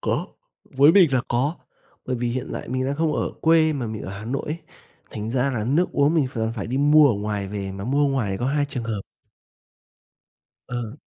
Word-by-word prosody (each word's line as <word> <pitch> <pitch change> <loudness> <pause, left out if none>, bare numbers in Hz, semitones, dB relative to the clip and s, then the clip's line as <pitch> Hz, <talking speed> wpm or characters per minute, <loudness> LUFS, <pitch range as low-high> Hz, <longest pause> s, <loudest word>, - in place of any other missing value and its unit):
có. - - -1 0.5
Với 145 +4 +7
mình 175 -8 +6
là 130 - +3
có, 135 +7 0 0.5
bởi 130 - -1
vì 120 0 -1
hiện 125 +1 -3
lại - - -6
mình 130 +1 -1
đang 140 - -2
không 160 -1 +1
ở - - -1
quê 160 -1 +4
mà 130 -5 -3
mình 110 -1 -5
ở - - -6
Hà 110 - -8
Nội 135 +4 -2
ấy, 155 +3 -3 0.5
thành 110 +1 -5
ra 130 +2 +1
là 115 -5 -2
nước 150 +10 +1
uống 145 +3 +3
mình 155 -5 +3
ph 125 - -8 0.2
phải 100 - -4
đi 125 - -2
mua 145 +1 +6
ở - - +1
ngoài 100 -1 -3
về, 100 -1 -4
mà 95 0 -6
mua 140 +4 +2
ngoài 130 -7 0
thì 95 - -2
có 120 - -2
hai 145 +2 +1
trường 130 -4 -5
hợp. 110 -3 -3 1.7
Ờ. 120 +2 -5
130 Hz, 225 wpm, -23 LUFS, 110-145 Hz, 1.7 s, Với